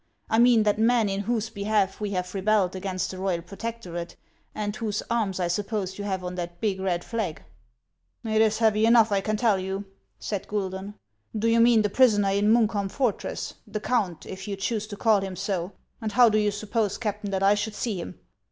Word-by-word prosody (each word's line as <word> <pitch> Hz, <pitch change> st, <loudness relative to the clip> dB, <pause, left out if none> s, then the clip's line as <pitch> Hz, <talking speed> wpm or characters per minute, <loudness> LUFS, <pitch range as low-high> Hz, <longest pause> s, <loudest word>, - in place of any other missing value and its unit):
I 225 Hz, -, +4 dB
mean 240 Hz, -2 st, +6 dB
that 210 Hz, 0 st, +1 dB
man 230 Hz, -1 st, +3 dB
in 195 Hz, 0 st, -2 dB
whose 220 Hz, +1 st, -1 dB
behalf 200 Hz, -2 st, 0 dB
we 210 Hz, -, -1 dB
have 180 Hz, -2 st, -3 dB
rebelled 195 Hz, -1 st, +1 dB
against 185 Hz, -1 st, -3 dB
the 185 Hz, -, -8 dB
royal 185 Hz, -3 st, -1 dB
protec 230 Hz, +5 st, -6 dB
torate, 170 Hz, -1 st, -6 dB, 0.4 s
and 205 Hz, -1 st, -3 dB
whose 215 Hz, -3 st, -2 dB
arms 210 Hz, -5 st, 0 dB
I 180 Hz, -, +1 dB
suppose 195 Hz, +1 st, -2 dB
you -, -, -3 dB
have 190 Hz, -2 st, -2 dB
on 180 Hz, 0 st, -4 dB
that 175 Hz, -1 st, -5 dB
big 200 Hz, -3 st, -1 dB
red 180 Hz, -2 st, -1 dB
flag." 220 Hz, -9 st, -3 dB, 0.4 s
" -, -, -30 dB
It 220 Hz, 0 st, +2 dB
is 220 Hz, -1 st, +3 dB
heavy 220 Hz, -1 st, +3 dB
enough, 230 Hz, -2 st, +5 dB
I 200 Hz, -1 st, +2 dB
can 215 Hz, +2 st, -1 dB
tell 215 Hz, -4 st, +2 dB
you! 190 Hz, +2 st, -4 dB, 0.2 s
" -, -, -44 dB
said 200 Hz, -3 st, -4 dB
Guidon. 195 Hz, 0 st, -4 dB, 0.4 s
"Do 220 Hz, +2 st, +1 dB
you 230 Hz, 0 st, +4 dB
mean 230 Hz, -2 st, +5 dB
the 210 Hz, -, +1 dB
prisoner 205 Hz, -5 st, +4 dB
in 205 Hz, +2 st, +3 dB
Munkholm 215 Hz, -4 st, +2 dB
fortress, 245 Hz, 0 st, -2 dB
— -, -, -40 dB
the 215 Hz, -, -4 dB
count, 205 Hz, -7 st, -1 dB
if 190 Hz, +1 st, -8 dB
you 200 Hz, -, -2 dB
choose 210 Hz, +2 st, -2 dB
to 205 Hz, -2 st, -8 dB
call 215 Hz, -3 st, +3 dB
him 190 Hz, -1 st, -5 dB
so; 185 Hz, 0 st, -3 dB, 0.3 s
and 220 Hz, -1 st, -2 dB
how 245 Hz, -1 st, +7 dB
do 215 Hz, 0 st, +2 dB
you 210 Hz, -1 st, +2 dB
suppose, 210 Hz, 0 st, -1 dB
Captain, 210 Hz, -2 st, -3 dB
that 195 Hz, 0 st, +1 dB
T 205 Hz, -, +5 dB
should 205 Hz, +1 st, -3 dB
see 210 Hz, -7 st, -2 dB
him 90 Hz, -, -8 dB
205 Hz, 220 wpm, -26 LUFS, 190-220 Hz, 0.4 s, how